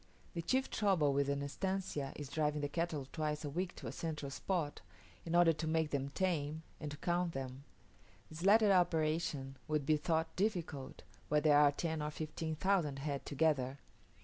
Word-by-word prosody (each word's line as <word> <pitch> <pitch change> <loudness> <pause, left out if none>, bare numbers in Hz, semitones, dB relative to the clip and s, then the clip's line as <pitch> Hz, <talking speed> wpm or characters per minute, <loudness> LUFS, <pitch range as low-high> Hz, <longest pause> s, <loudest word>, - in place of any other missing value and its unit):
The 170 - -2
chief 260 +10 +1
trouble 180 -9 +3
with 140 0 +1
an 140 0 0
estancia 150 -2 -2
is 145 - -6
driving 150 +1 0
the 145 - 0
cattle 155 -3 -2
twice 150 -1 -2
a 145 - -3
week 180 +4 -2
to - - -9
a - - -3
central 150 -4 -4
spot, 155 +1 -2 0.5
in 165 - 0
order 175 -1 +6
to 160 +1 -4
make 160 -1 +1
them 140 -1 -1
tame, 160 -2 -1 0.2
and 150 - -4
to 145 - -7
count 175 +1 0
them. 135 +1 -6 0.6
This 155 +2 -8
latter 210 +1 +6
operation 155 -6 +1
would 150 -2 0
be 155 +1 +4
thought 160 +1 0
difficult, 175 -9 -2 0.3
where 150 - +4
there 145 -1 +6
are 145 -1 +6
ten 160 +1 -2
or 150 - -1
fifteen 155 +1 -4
thousand 165 -5 +1
head 140 0 -3
together. 140 -3 +1
155 Hz, 180 wpm, -36 LUFS, 145-170 Hz, 0.6 s, order